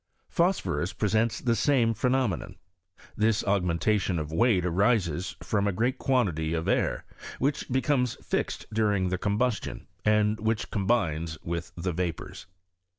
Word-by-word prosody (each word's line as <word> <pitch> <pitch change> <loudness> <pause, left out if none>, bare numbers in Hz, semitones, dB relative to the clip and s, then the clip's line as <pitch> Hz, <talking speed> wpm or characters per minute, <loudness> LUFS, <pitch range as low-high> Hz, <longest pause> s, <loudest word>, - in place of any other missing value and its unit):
Phos 180 +2 +2
phorus 80 +5 -2
presents 110 +2 +1
the 120 -2 +1
same 120 -4 +3
phenomenon. 125 - 0 0.6
This 110 +1 +2
aug 100 -1 +2
mentation 90 +2 +1
of 75 -1 -4
weight 100 0 +3
arises 90 -2 +1
from 105 -1 0
a - - +2
great 120 +7 0
quantity 90 - +1
ci 80 - 0
air, - - 0 0.3
which 140 +2 -1
becomes 130 -2 +1
fixed - - -3
during 105 -4 +1
the 90 0 -2
combustion, 105 +3 -1 0.2
and 105 0 +2
which 110 0 -1
combines 85 -7 0
with 85 0 -4
the 90 +1 -2
vapours. 85 -1 -4
105 Hz, 140 wpm, -27 LUFS, 90-115 Hz, 0.6 s, same